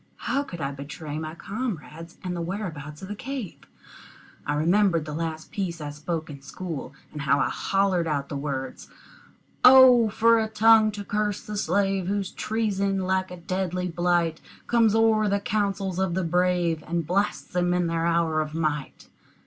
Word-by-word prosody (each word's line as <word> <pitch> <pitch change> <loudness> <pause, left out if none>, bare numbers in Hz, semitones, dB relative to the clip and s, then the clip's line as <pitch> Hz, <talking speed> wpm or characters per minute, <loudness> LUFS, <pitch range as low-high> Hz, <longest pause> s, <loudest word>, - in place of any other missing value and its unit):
How 265 +4 -1
could 180 -12 -8
I 140 -2 -2
betray 145 +2 -6
my 155 0 -6
comrades 170 - -6
and 180 -1 -3
the 170 - -3
whereabouts 165 -5 -5
of - - -6
the 205 - -4
cave? 250 -2 -6 0.9
I 145 - 0
remembered 170 +1 +2
the 150 - -6
last 160 0 -4
piece 180 -4 -3
I 145 -1 -5
spoke 155 +2 -4
in 140 -2 -9
school, 140 -1 -6 0.2
and 150 - -5
how 140 0 +2
I - - +1
hollered 195 -3 0
out 140 -3 -1
the 145 - -6
words, 140 -2 -4 0.8
"O 250 -3 +8
for 230 +2 +4
a 220 - 0
tongue 220 0 +5
to 205 0 -6
curse 210 0 -2
the 210 - -5
slave 195 -2 0
Whose 200 0 -1
treason, 200 -3 -1
like 185 0 0
a 180 - -8
deadly 180 +1 -2
blight, 175 -1 0 0.2
Comes 225 -3 +3
o'er 220 -2 +3
the 200 0 +1
councils 195 -3 -1
of 190 -3 0
the 190 - 0
brave, 175 -2 +1
And 170 0 -1
blasts 195 +5 -1
them 175 0 +1
in 180 0 +1
their 165 0 0
hour 165 -2 +1
of 155 0 -5
might!" 150 -3 -3
180 Hz, 175 wpm, -25 LUFS, 160-205 Hz, 0.9 s, O